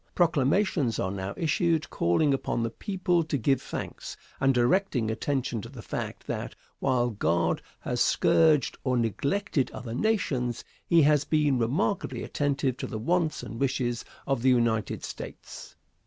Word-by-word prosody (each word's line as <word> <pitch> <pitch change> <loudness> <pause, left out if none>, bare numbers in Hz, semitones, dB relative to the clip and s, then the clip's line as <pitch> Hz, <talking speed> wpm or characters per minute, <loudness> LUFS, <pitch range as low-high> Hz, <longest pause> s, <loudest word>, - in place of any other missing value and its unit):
Proclamations 155 - +2
are 95 - -1
now 95 0 -4
issued 165 0 +1
calling 140 - +2
upon 125 -3 -1
the 115 - -2
people 180 - 0
to 155 -2 -1
give 130 +2 +1
thanks, - - -6 0.2
and 135 0 +4
directing 125 - +2
attention 125 -1 -2
to 115 - -9
the 125 -4 -10
fact - - -5
that, - - -4 0.2
while 125 -2 +1
God 85 -4 +1 0.2
has - - -2
scourged 155 -5 +3
or 130 -2 +1
neglected 140 - 0
other 120 -2 -7
nations, 130 - 0 0.2
he 170 -3 +5
has 150 -1 +4
been 145 -4 +2
remarkably 130 - 0
attentive 140 -3 -1
to - - -4
the 110 - -5
wants 160 +6 0
and 115 - -7
wishes 125 -3 0 0.2
of 135 -4 0
the 130 - +4
United 115 -3 +1
States. - - -8
135 Hz, 150 wpm, -27 LUFS, 120-155 Hz, 0.2 s, he